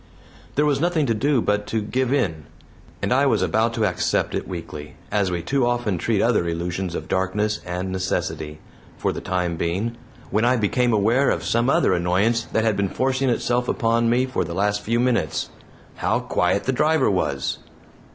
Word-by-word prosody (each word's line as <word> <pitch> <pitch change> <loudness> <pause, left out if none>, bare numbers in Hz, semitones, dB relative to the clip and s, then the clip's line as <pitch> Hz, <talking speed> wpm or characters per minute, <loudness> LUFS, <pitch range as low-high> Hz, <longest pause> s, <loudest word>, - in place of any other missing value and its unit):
There 150 - +3
was 145 -2 +1
nothing 170 -3 +2
to 115 - +1
do 135 +3 +1
but 105 0 0
to 110 - -1
give 125 +4 -1
in 85 - 0 0.6
and - - +2
I 140 +2 +3
was 110 -7 +2
about 110 +6 +1
to 110 - +1
accept 90 -4 0
it - - -3
weakly, 80 -4 -7 0.2
as 100 -2 +1
we 85 -1 -3
too 135 +5 +1
often 120 -7 0
treat 110 0 +1
other 115 -7 +2
illusions 85 +1 -3
of - - -5
darkness 105 +3 0
and 90 +1 -3
necessity, 90 -4 -2 0.4
for - - 0
the - - -6
time 90 -2 -1
being, 95 +9 -1 0.4
when 105 +3 +1
I 125 +2 +4
became 120 +3 +1
aware 115 +6 +3
of - - 0
some 120 +2 +1
other 115 - +3
annoyance 95 +7 +2
that 110 - 0
had 110 -2 +2
been 100 -1 0
forcing 130 +3 0
itself 120 +1 0
upon 115 0 +1
me 125 +2 +3
for 130 - -1
the 85 0 -6
last 105 +1 +1
few 115 +3 0
moments. 125 -1 0 0.5
How - - +1
quiet 90 +3 0
the 130 - 0
driver 155 -1 +2
was! 70 -8 -1
110 Hz, 190 wpm, -23 LUFS, 90-120 Hz, 0.6 s, I